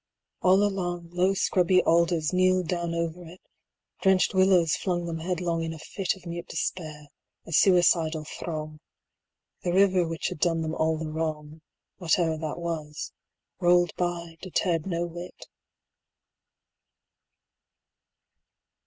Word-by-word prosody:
All 190 Hz, +2 st, +5 dB
along, 175 Hz, -4 st, -2 dB
115 -, -, -13 dB
Low 190 Hz, +2 st, +4 dB
scrubby 185 Hz, -1 st, +3 dB
alders 170 Hz, -1 st, +2 dB
kneeled 185 Hz, -1 st, +3 dB
down 170 Hz, -1 st, -2 dB
over 170 Hz, +1 st, -3 dB
it; 175 Hz, +2 st, -12 dB, 0.6 s
Drenched 190 Hz, -1 st, +3 dB
willows 185 Hz, -4 st, +4 dB
flung 175 Hz, -2 st, -2 dB
them 165 Hz, -1 st, -4 dB
headlong 170 Hz, -1 st, -2 dB
in 165 Hz, 0 st, -3 dB
a -, -, -8 dB
fit 185 Hz, +5 st, -3 dB
Of 190 Hz, -, -17 dB
mute 170 Hz, 0 st, -6 dB
despair, 155 Hz, -4 st, -4 dB, 0.4 s
a -, -, -10 dB
suicidal 165 Hz, -3 st, +3 dB
throng; 155 Hz, -1 st, -6 dB, 0.8 s
The 175 Hz, -, -1 dB
river 185 Hz, -2 st, +4 dB
which 165 Hz, 0 st, -3 dB
had -, -, -7 dB
done 165 Hz, -1 st, +1 dB
them 160 Hz, 0 st, -3 dB
all 160 Hz, 0 st, +1 dB
the 155 Hz, -1 st, -5 dB
wrong, 155 Hz, -1 st, -4 dB, 0.4 s
Whate'er 165 Hz, -2 st, +1 dB
that 155 Hz, -1 st, -4 dB
was, 160 Hz, -3 st, -5 dB, 0.5 s
rolled 175 Hz, -1 st, +3 dB
by, 170 Hz, -2 st, -3 dB
deterred 175 Hz, -2 st, -1 dB
no 170 Hz, -2 st, -1 dB
whit. 175 Hz, +1 st, -9 dB
170 Hz, 130 wpm, -27 LUFS, 160-180 Hz, 0.8 s, All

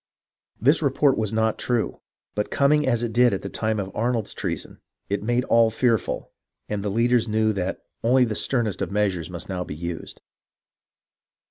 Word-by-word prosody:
This 140 Hz, +9 st, +4 dB
report 140 Hz, -1 st, +3 dB
was 110 Hz, -2 st, -1 dB
not 110 Hz, 0 st, +1 dB
true; 120 Hz, -3 st, -1 dB, 0.3 s
but 105 Hz, 0 st, -2 dB
coming 150 Hz, +1 st, +3 dB
as 120 Hz, -2 st, +1 dB
it 115 Hz, -2 st, -2 dB
did 120 Hz, -2 st, +4 dB
at -, -, -6 dB
the 100 Hz, -, -4 dB
time 110 Hz, 0 st, -1 dB
of 95 Hz, -1 st, -5 dB
Arnold's 115 Hz, -1 st, -1 dB
treason, -, -, -4 dB, 0.3 s
it 100 Hz, 0 st, -1 dB
made 120 Hz, +3 st, +1 dB
all 115 Hz, -2 st, +4 dB
fearful, 115 Hz, -1 st, 0 dB, 0.4 s
and 105 Hz, -1 st, -2 dB
the 105 Hz, -, -1 dB
leaders 115 Hz, +2 st, +2 dB
knew 110 Hz, 0 st, +2 dB
that 95 Hz, -1 st, -3 dB, 0.2 s
only 125 Hz, +2 st, +5 dB
the 110 Hz, -, -2 dB
sternest 115 Hz, -2 st, -1 dB
of -, -, -1 dB
measures 95 Hz, -5 st, 0 dB
must 85 Hz, -1 st, -6 dB
now 90 Hz, -2 st, -3 dB
be 75 Hz, -, -7 dB
used. 85 Hz, +1 st, -6 dB
110 Hz, 175 wpm, -24 LUFS, 100-120 Hz, 0.4 s, only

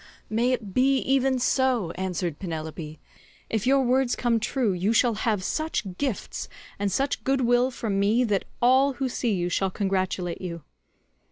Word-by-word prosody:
"May 235 Hz, +3 st, +2 dB
it 220 Hz, -6 st, -3 dB
be 265 Hz, +3 st, +3 dB
even 265 Hz, 0 st, +2 dB
so," 250 Hz, -7 st, +1 dB
answered 180 Hz, -3 st, -3 dB
Penelope; 160 Hz, -3 st, -6 dB, 0.5 s
"if 220 Hz, +1 st, -1 dB
your 275 Hz, +1 st, +5 dB
words 255 Hz, 0 st, +2 dB
come 235 Hz, -2 st, +1 dB
true, 230 Hz, -2 st, 0 dB
you 190 Hz, +5 st, 0 dB
shall 235 Hz, 0 st, +3 dB
have 215 Hz, -2 st, -1 dB
such 220 Hz, -, -2 dB
gifts 265 Hz, -8 st, -3 dB, 0.3 s
and 200 Hz, -1 st, 0 dB
such 270 Hz, +8 st, -1 dB
good 270 Hz, 0 st, +1 dB
will 245 Hz, +1 st, +3 dB
from 220 Hz, -6 st, -2 dB
me 215 Hz, +5 st, +3 dB
that 205 Hz, -5 st, 0 dB, 0.2 s
all 265 Hz, +3 st, +5 dB
who 265 Hz, +1 st, -2 dB
see 240 Hz, -2 st, -1 dB
you 175 Hz, -1 st, -1 dB
shall 190 Hz, +2 st, 0 dB
congratulate 185 Hz, -2 st, -2 dB
you." 170 Hz, -4 st, -6 dB
225 Hz, 165 wpm, -26 LUFS, 185-255 Hz, 0.5 s, your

